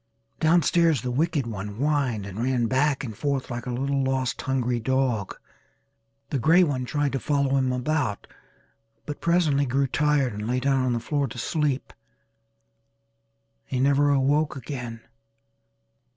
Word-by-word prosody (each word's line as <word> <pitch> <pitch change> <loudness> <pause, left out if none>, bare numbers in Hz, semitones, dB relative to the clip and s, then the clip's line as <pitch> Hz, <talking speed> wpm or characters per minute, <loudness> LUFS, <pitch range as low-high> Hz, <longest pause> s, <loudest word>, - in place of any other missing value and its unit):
Down 165 +1 +4
stairs 165 -8 +3
the 125 - -2
wicked 150 +1 0
one 105 -2 -5
whined 135 -5 0
and 100 +3 -6
ran 125 -1 +1
back 135 +4 +1
and 110 -5 -6
forth 140 +1 -2
like 120 +1 -5
a - - -2
little 135 +2 -1
lost 130 -1 -1
hungry 125 -3 0
dog. 125 -4 -1 0.9
The 140 - 0
grey 165 +9 +5
one 135 -6 -1
tried 145 +1 -1
to 135 - -2
follow 140 -2 +1
him 130 -1 +1
about 125 -4 -1 0.8
but 150 - -6
presently 155 -5 +2
grew 135 +3 +1
tired 140 -2 +1
and 105 +1 -5
lay 125 +1 0
down 135 0 +1
on 125 - +1
the 120 - 0
floor 140 +4 -1
to 125 0 -9
sleep. 145 +1 -1 1.7
He 130 - -3
never 140 +2 +3
awoke 145 +2 +2
again. 125 -4 -6
135 Hz, 150 wpm, -25 LUFS, 125-145 Hz, 1.7 s, grey